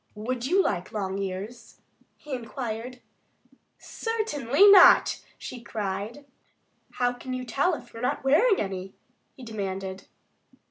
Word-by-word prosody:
"Would 240 +4 -3
you 380 +5 +3
like 180 -2 -2
long 195 -2 -3
ears?" 200 +5 -6 0.4
he 295 - -9
inquired. 245 0 -5 0.8
"Certainly 405 - +2
not!" 390 -2 +7 0.2
she 245 - -8
cried. 215 +4 -5 0.7
"How 245 0 0
can 255 +1 -6
you 255 0 -5
tell 280 +9 +1
if 240 -5 -13
you've 230 - -8
never 250 - +1
tried - - -17
wearing 385 - +4
any?" 190 -1 -4 0.4
he 260 - -12
demanded. 195 -4 -5
240 Hz, 130 wpm, -26 LUFS, 200-270 Hz, 0.8 s, not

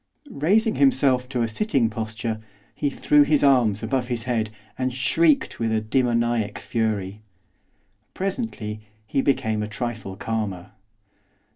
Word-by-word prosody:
Raising 215 - +2
himself 135 - +3
to 125 -3 0
a - - +1
sitting 130 - +1
posture, 110 0 -4 0.3
he 145 - -1
threw 150 +1 +3
his 145 0 +3
arms 120 -7 +3
above 125 +2 -1
his 120 -2 -2
head, 115 -3 -1 0.3
and 130 0 -1
shrieked 140 +5 +2
with 115 -1 0
a 110 - +2
demoniac 115 -1 0
fury. 105 -3 -2 0.9
Presently 185 - -3 0.2
he 135 - 0
became 110 -6 +1
a 105 - -2
trifle 110 -3 -5
calmer. 100 -4 -4
120 Hz, 130 wpm, -24 LUFS, 110-135 Hz, 0.9 s, himself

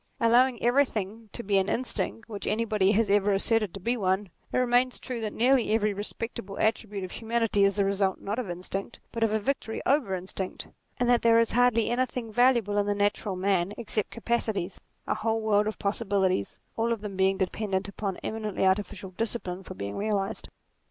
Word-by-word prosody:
Allowing 245 +1 +4
everything 230 -4 +1
to 235 - -5
be 200 -2 +3
an 190 +1 0
instinct 235 -2 -2
which 210 -3 -6
anybody 210 -3 +2
has 220 +1 +3
ever 205 0 +3
asserted 215 0 +1
to - - -6
be 235 +6 0
one, 195 -2 0 0.2
it - - 0
remains 250 0 +2
true 250 -3 -5
that 215 -1 -2
nearly 245 -1 +3
every 210 -2 +1
respectable 205 -1 -5
attribute 215 -3 0
of 185 - -6
humanity 225 -3 +1
is 195 0 +3
the 200 -1 +2
result 195 -1 +1
not 205 +4 -3
of 235 -7 -4
instinct, 185 +5 -5
but 230 - -5
of 225 -1 +3
a 220 - +2
victory 225 -1 -2
over 260 -9 +2
instinct; 185 +1 -5 0.3
and 245 - +1
that 245 -1 +4
there 230 0 +5
is 230 - +2
hardly 240 -2 +3
anything 245 -2 -1
valuable 235 -3 +3
in 205 - 0
the 205 - +1
natural 205 -1 0
man 190 0 +1
except 215 -2 -2
capacities 220 -5 -2 0.2
a - - 0
whole 225 0 0
world 210 -1 +2
of 215 - -3
possibilities, 200 - 0 0.2
all 230 +1 0
of 230 -3 -1
them 205 -2 -6
dependent 190 +1 0
upon 200 -1 -4
eminently 215 -3 -2
artificial 190 0 0
discipline 190 -3 -3
for - - -9
being 100 +1 -5
realized. 205 -1 -2
210 Hz, 185 wpm, -28 LUFS, 195-230 Hz, 0.3 s, there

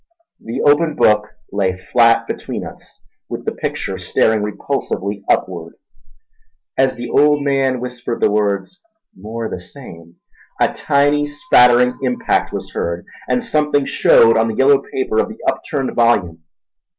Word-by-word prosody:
The 115 - -4
open 150 +1 +3
book 105 0 +3 0.2
lay 95 -2 -1
flat 115 +4 +3
between - - -5
us, - - -13 0.3
with - - -6
the - - -1
picture - - -4
staring 110 -1 +1
repulsively 105 -2 -3
upward. 85 -3 -1 1.0
As 130 0 +2
the 120 0 -6
old 145 +3 +3
man 135 -2 +1
whispered 125 -1 -5
the - - +2
words 100 - -1 0.4
"more 110 +4 -6
the 90 - -6
same" 85 -7 -12 0.4
a - - +2
tiny 145 0 +1
spattering 125 -4 +3
impact 125 -2 0
was - - -6
heard, 85 +1 -3 0.2
and 250 - +1
something 150 -9 +1
shewed 115 -3 +4
on 110 0 +2
the 110 - -3
yellowed 140 +2 +3
paper 120 -4 -1
of - - -4
the - - -10
upturned 135 -2 -2
volume. 100 -9 +1
120 Hz, 140 wpm, -18 LUFS, 105-140 Hz, 1.0 s, shewed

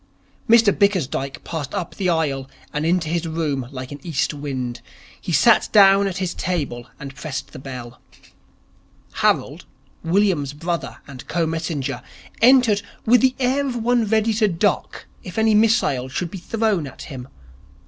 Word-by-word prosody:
Mr 225 -3 +6
Bickersdyke 155 -9 0
passed 160 -2 -5
up 180 -4 -4
the 190 -3 -1
aisle 140 -5 -1 0.2
and 150 +2 -1
into 175 -2 +1
his 170 +1 -1
room 150 -6 -2
like 130 -1 -7
an 145 - -7
east 150 -3 -1
wind. 130 -4 -4 0.4
He - - -4
sat - - +4
down 195 -1 +6
at 185 -2 -4
his 185 -2 -2
table 145 -10 -3
and 135 0 -8
pressed 145 -1 -6
the - - -9
bell. 125 -3 -9 1.1
Harold, - - 0 0.4
William's 170 -6 +1
brother 170 +3 -4
and 135 -3 -10
co 170 -1 0
messenger, 160 -4 -3 0.4
entered 240 -4 +5 0.2
with 240 +1 +5
the 260 -1 +3
air 270 +2 +1
of 255 - -3
one 240 0 +1
ready 220 +1 +2
to 215 0 +2
duck 190 +1 -1 0.2
if 180 - -9
any 220 0 +3
missile 210 - +2
should 170 +6 -3
be 195 - -6
thrown 210 -6 0
at 135 - -10
him. 130 -4 -8
170 Hz, 160 wpm, -21 LUFS, 140-210 Hz, 1.1 s, Mr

